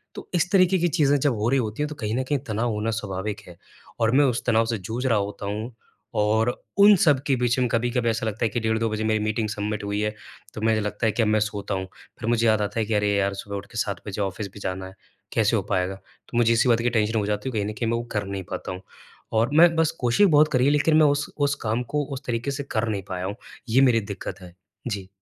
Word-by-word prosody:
तो -, -, -8 dB
इस 180 Hz, 0 st, +1 dB
तरीके 190 Hz, -1 st, +4 dB
की 175 Hz, -, +2 dB
चीजें 145 Hz, -4 st, +3 dB
जब 140 Hz, -1 st, +2 dB
हो 110 Hz, +2 st, 0 dB
रही 135 Hz, -, +3 dB
होती 110 Hz, +3 st, -3 dB
हैं 150 Hz, -, -1 dB
तो 150 Hz, -, -7 dB
कहीं 110 Hz, -4 st, -3 dB
न 130 Hz, -, 0 dB
कहीं 145 Hz, -, +2 dB
तनाव 115 Hz, +2 st, -1 dB
होना 105 Hz, +2 st, -1 dB
स्वाभाविक 105 Hz, -1 st, -4 dB
है। 90 Hz, -1 st, -12 dB, 0.4 s
और 115 Hz, 0 st, +3 dB
मैं 145 Hz, +1 st, +6 dB
उस 125 Hz, -3 st, 0 dB
तनाव 115 Hz, -2 st, +3 dB
से 115 Hz, 0 st, -1 dB
जूझ 110 Hz, +7 st, -5 dB
रहा 115 Hz, -4 st, +3 dB
होता 100 Hz, 0 st, -3 dB
हूँ 105 Hz, +4 st, -4 dB, 0.5 s
और 110 Hz, +3 st, +2 dB, 0.3 s
उन 205 Hz, +1 st, +8 dB
सब 150 Hz, -6 st, +4 dB
के 135 Hz, -, +3 dB
बीच 120 Hz, -1 st, +1 dB
में 125 Hz, -, +2 dB
कभी-कभी 120 Hz, 0 st, 0 dB
ऐसा 115 Hz, +1 st, -1 dB
लगता 110 Hz, +1 st, -1 dB
है 110 Hz, -, +1 dB
कि 120 Hz, -, -2 dB
डेढ़ 110 Hz, 0 st, 0 dB
2 115 Hz, 0 st, 0 dB
बजे 110 Hz, 0 st, -2 dB
मेरी 110 Hz, 0 st, +1 dB
मीटिंग 110 Hz, 0 st, -1 dB
सबमिट 105 Hz, 0 st, -3 dB
हुई 100 Hz, 0 st, -2 dB
है 105 Hz, 0 st, -1 dB, 0.4 s
तो 110 Hz, -, -7 dB
मुझे 110 Hz, 0 st, +2 dB
लगता 105 Hz, +2 st, -2 dB
है 110 Hz, -, +3 dB
कि 120 Hz, -, -1 dB
अब -, -, +1 dB
मैं 110 Hz, 0 st, +3 dB
सोता 105 Hz, -1 st, -3 dB
हूँ 95 Hz, 0 st, -4 dB, 0.3 s
फिर 115 Hz, -, -2 dB
मुझे 115 Hz, -1 st, +2 dB
याद 110 Hz, -1 st, +3 dB
आता 105 Hz, +2 st, -2 dB
है 110 Hz, -, +1 dB
कि 110 Hz, -, -2 dB
अरे 105 Hz, 0 st, +2 dB
यार! 100 Hz, 0 st, +1 dB
सुबह 100 Hz, +1 st, -6 dB
उठ 100 Hz, -, -7 dB
के -, -, -8 dB
7 100 Hz, -2 st, -2 dB
बजे 100 Hz, +1 st, -3 dB
ऑफ़िस 100 Hz, +1 st, -3 dB
भी -, -, -10 dB
जाना 95 Hz, -1 st, -4 dB
है, 95 Hz, -, -12 dB, 0.4 s
कैसे -, -, +2 dB
हो -, -, +1 dB
पाएगा? 90 Hz, +1 st, 0 dB
तो 120 Hz, +4 st, -11 dB
मुझे 115 Hz, -1 st, +4 dB
इसी 115 Hz, +2 st, +3 dB
बात 115 Hz, -1 st, +4 dB
की 120 Hz, -, +1 dB
टेंशन 110 Hz, -1 st, +1 dB
हो 105 Hz, -, -1 dB
जाती 105 Hz, +5 st, -2 dB
है -, -, -5 dB
तो 115 Hz, -, -3 dB
कहीं 100 Hz, -, 0 dB
न -, -, -7 dB
कहीं 115 Hz, -, 0 dB
मैं 115 Hz, -, +1 dB
वो 120 Hz, -, -3 dB
कर 105 Hz, -2 st, -1 dB
नहीं 95 Hz, -1 st, -5 dB
पाता -, -, -4 dB
हूँ। 90 Hz, 0 st, -7 dB, 0.5 s
और 115 Hz, +4 st, +2 dB
मैं 165 Hz, +2 st, +6 dB
बस 165 Hz, -1 st, +2 dB
कोशिश 125 Hz, +12 st, +4 dB
बहुत 150 Hz, -3 st, +5 dB
करी 125 Hz, 0 st, +3 dB
है 140 Hz, -, +4 dB
लेकिन 150 Hz, +2 st, +3 dB
मैं 155 Hz, -, +6 dB
उस 145 Hz, +1 st, +1 dB
उस 140 Hz, -1 st, +1 dB
काम 110 Hz, +3 st, 0 dB
को 150 Hz, -, +2 dB
उस 135 Hz, -, -5 dB
तरीके 120 Hz, +3 st, -2 dB
से 140 Hz, +1 st, -4 dB
कर 110 Hz, +1 st, 0 dB
नहीं 100 Hz, -3 st, -2 dB
पाया 90 Hz, -1 st, -3 dB
हूँ 100 Hz, +2 st, -4 dB, 0.3 s
ये 130 Hz, +4 st, +4 dB
मेरी 120 Hz, -4 st, +4 dB
दिक्कत 100 Hz, -1 st, -7 dB
है। 90 Hz, -1 st, -12 dB, 0.3 s
जी। 100 Hz, -4 st, -4 dB
110 Hz, 285 wpm, -24 LUFS, 105-125 Hz, 0.5 s, उन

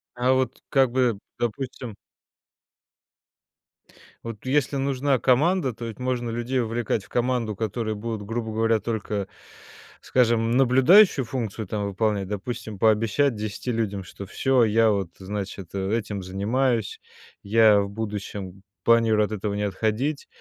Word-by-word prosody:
А 125 Hz, +1 st, +2 dB
вот, 130 Hz, -1 st, -1 dB
как 135 Hz, -3 st, +3 dB
бы, 125 Hz, -4 st, +2 dB, 0.2 s
допустим 120 Hz, -1 st, -4 dB, 2.3 s
Вот, 115 Hz, -1 st, -8 dB
если 140 Hz, +1 st, +1 dB
нужна 135 Hz, 0 st, +1 dB
команда, 140 Hz, +3 st, +2 dB
то 115 Hz, +2 st, -7 dB
ведь 115 Hz, 0 st, -7 dB
можно 125 Hz, -2 st, -2 dB
людей 120 Hz, +3 st, -1 dB
вовлекать 115 Hz, -2 st, -1 dB
в -, -, -19 dB
команду, 120 Hz, -3 st, 0 dB
которые 110 Hz, +1 st, -2 dB
будут, 110 Hz, 0 st, -4 dB
грубо 115 Hz, +1 st, -3 dB
говоря, 115 Hz, 0 st, +2 dB
только, 105 Hz, -2 st, -3 dB, 0.7 s
скажем, 115 Hz, -2 st, +2 dB
наблюдающую 135 Hz, -, +6 dB
функцию, 115 Hz, -5 st, -4 dB
там, 105 Hz, +1 st, -2 dB
выполнять. 100 Hz, -1 st, -1 dB
Допустим, 105 Hz, +1 st, -5 dB
пообещать 115 Hz, +5 st, +2 dB
10 110 Hz, +3 st, -4 dB
людям, 105 Hz, -4 st, -2 dB
что 100 Hz, -, -9 dB
всё, 130 Hz, +5 st, +2 dB
я, 115 Hz, +1 st, +4 dB
вот, 100 Hz, -4 st, -1 dB
значит, 100 Hz, -1 st, -6 dB
этим 100 Hz, 0 st, -2 dB
занимаюсь, 110 Hz, +5 st, -1 dB, 0.4 s
я 110 Hz, 0 st, +5 dB
в 100 Hz, -, -3 dB
будущем 100 Hz, -2 st, -6 dB, 0.2 s
планирую 115 Hz, -2 st, +4 dB
от 105 Hz, -, -8 dB
этого 105 Hz, 0 st, -3 dB
не 105 Hz, 0 st, -2 dB
отходить, 110 Hz, +8 st, -1 dB
115 Hz, 130 wpm, -24 LUFS, 105-125 Hz, 2.3 s, наблюдающую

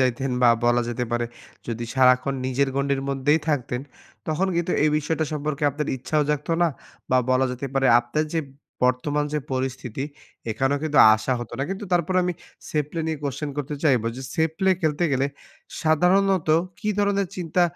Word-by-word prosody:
যাইতেন 130 Hz, +1 st, +1 dB
বা, 120 Hz, -, +7 dB, 0.2 s
বলা 120 Hz, 0 st, +4 dB
যেতে 120 Hz, +1 st, -2 dB
পারে 120 Hz, 0 st, 0 dB, 0.4 s
যদি 115 Hz, 0 st, -3 dB
সারাক্ষণ 130 Hz, +1 st, +4 dB
নিজের 135 Hz, +2 st, +1 dB
গণ্ডির 140 Hz, -1 st, 0 dB
মধ্যেই 140 Hz, +3 st, +2 dB
থাকতেন, 125 Hz, -4 st, -1 dB, 0.5 s
তখন 160 Hz, +5 st, 0 dB
কিন্তু 175 Hz, +1 st, 0 dB
এই 155 Hz, -, +4 dB
বিষয়টা 160 Hz, +1 st, -1 dB
সম্পর্কে 150 Hz, 0 st, -3 dB
আপনার 150 Hz, +2 st, -3 dB
ইচ্ছাও 150 Hz, +4 st, 0 dB
জাগতো 150 Hz, +3 st, -1 dB
না 170 Hz, -, +4 dB, 0.4 s
বা, 130 Hz, -, +5 dB
বলা 130 Hz, +1 st, +3 dB
যেতে 125 Hz, +2 st, -5 dB
পারে 135 Hz, 0 st, +3 dB
আপনার 135 Hz, +6 st, -1 dB
যে 165 Hz, -, +2 dB, 0.4 s
বর্তমান 145 Hz, +4 st, +1 dB
যে 150 Hz, -, +1 dB
পরিস্থিতি, 130 Hz, -1 st, -3 dB, 0.5 s
এখানেও 135 Hz, +6 st, 0 dB
কিন্তু 150 Hz, -2 st, +1 dB, 0.2 s
আসা 110 Hz, +4 st, -1 dB
হতো 120 Hz, -, -8 dB
না। 135 Hz, -, 0 dB
কিন্তু 195 Hz, +2 st, -4 dB
তারপরে 175 Hz, +1 st, +1 dB
আমি 180 Hz, -, 0 dB, 0.4 s
safe 150 Hz, -2 st, 0 dB
play 165 Hz, -1 st, -3 dB
নিয়ে 160 Hz, -2 st, -2 dB
question 145 Hz, +1 st, -3 dB
করতে 145 Hz, +1 st, -3 dB
চাইব 130 Hz, -6 st, +4 dB
যে 130 Hz, -, -6 dB
safe 160 Hz, 0 st, +1 dB
play 190 Hz, -1 st, +3 dB
খেলতে 155 Hz, +2 st, +1 dB
গেলে 135 Hz, +1 st, +2 dB, 0.6 s
সাধারণত 180 Hz, +2 st, +3 dB, 0.3 s
কি 210 Hz, -, -3 dB
ধরনের 200 Hz, -1 st, +2 dB
চিন্তা 180 Hz, 0 st, 0 dB
145 Hz, 175 wpm, -24 LUFS, 130-160 Hz, 0.6 s, বা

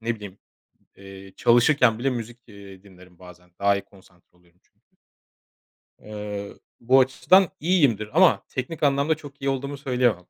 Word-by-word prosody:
ne 115 Hz, +1 st, -2 dB
bileyim, 100 Hz, -2 st, -11 dB, 0.6 s
eee, 95 Hz, 0 st, -13 dB
çalışırken 120 Hz, -1 st, +3 dB
bile 135 Hz, +3 st, -1 dB
müzik, 120 Hz, -1 st, -6 dB
eee, 100 Hz, -3 st, -14 dB
dinlerim 90 Hz, -3 st, -19 dB
bazen, 90 Hz, -1 st, -16 dB
daha 100 Hz, 0 st, +2 dB
iyi 100 Hz, -, -7 dB
konsantre 90 Hz, -3 st, -23 dB
oluyorum 90 Hz, 0 st, -31 dB
çünkü. -, -, -41 dB, 1.2 s
Eee, 105 Hz, -1 st, -7 dB, 0.3 s
bu 130 Hz, +3 st, +3 dB
açıdan 175 Hz, +8 st, +3 dB
iyiyimdir 140 Hz, -, +1 dB
ama 185 Hz, -2 st, +4 dB
teknik 150 Hz, +5 st, -6 dB
anlamda 140 Hz, +2 st, +2 dB
çok 140 Hz, -2 st, -14 dB
iyi 135 Hz, -, -1 dB
olduğumu 140 Hz, +1 st, -4 dB
söyleyemem. 125 Hz, -9 st, -1 dB
115 Hz, 145 wpm, -23 LUFS, 95-135 Hz, 1.2 s, ama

